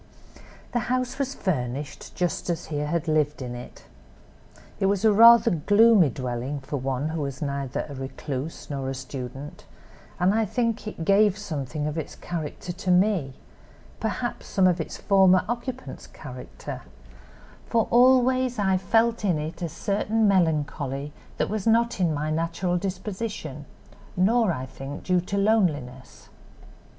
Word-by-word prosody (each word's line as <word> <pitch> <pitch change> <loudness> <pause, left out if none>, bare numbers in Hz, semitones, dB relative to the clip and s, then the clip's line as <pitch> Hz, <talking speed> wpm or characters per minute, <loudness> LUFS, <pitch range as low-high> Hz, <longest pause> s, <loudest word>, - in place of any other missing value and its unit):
"The 240 - +1
house 255 +1 -1
was 275 0 -2
furnished, 140 -5 -3
just 175 0 -2
as 170 -1 -2
he - - -1
had 150 +2 -1
lived 150 -1 +1
in 125 -2 -5
it. 120 0 -10 0.9
It 195 - +2
was 200 +1 +1
a 215 - +6
rather 230 +2 +8
gloomy 205 +2 +5
dwelling 125 +2 -4
for 145 +2 -4
one 135 +3 -2
who 160 -1 -3
was 140 -2 -4
neither 140 -2 -3
a 145 - -8
recluse 135 +2 -5
nor 135 -2 -3
a 135 - -3
student, 135 +4 -7 0.5
and 180 +3 +3
I 225 +1 +2
think 230 0 -1
it 165 -6 -5
gave 200 +1 +4
something 150 -6 -4
of 150 +2 -2
its 155 - -6
character 170 +1 -5
to 185 +1 -5
me—perhaps 180 -7 -2
some 190 - +2
of 180 -2 +3
its - - -6
former 190 -2 +4
occupant's 245 +2 -5
character; - - -9 0.9
for 230 -2 +1
always 255 0 +4
I 190 -2 +2
felt 225 +5 +2
in 180 -6 +2
it 155 +4 -5
a 170 - -2
certain 210 +5 0
melancholy 150 -6 0 0.2
that - - +1
was 215 0 -3
not 230 0 +3
in 175 -3 +2
my 150 +1 -2
natural 170 +3 -1
disposition, 185 -6 -5 0.5
nor, 220 +2 +3
I 130 -5 -3
think, 135 +2 -8
due 180 -1 +2
to 200 +3 -3
loneliness. 165 - 0
175 Hz, 145 wpm, -25 LUFS, 145-210 Hz, 0.9 s, rather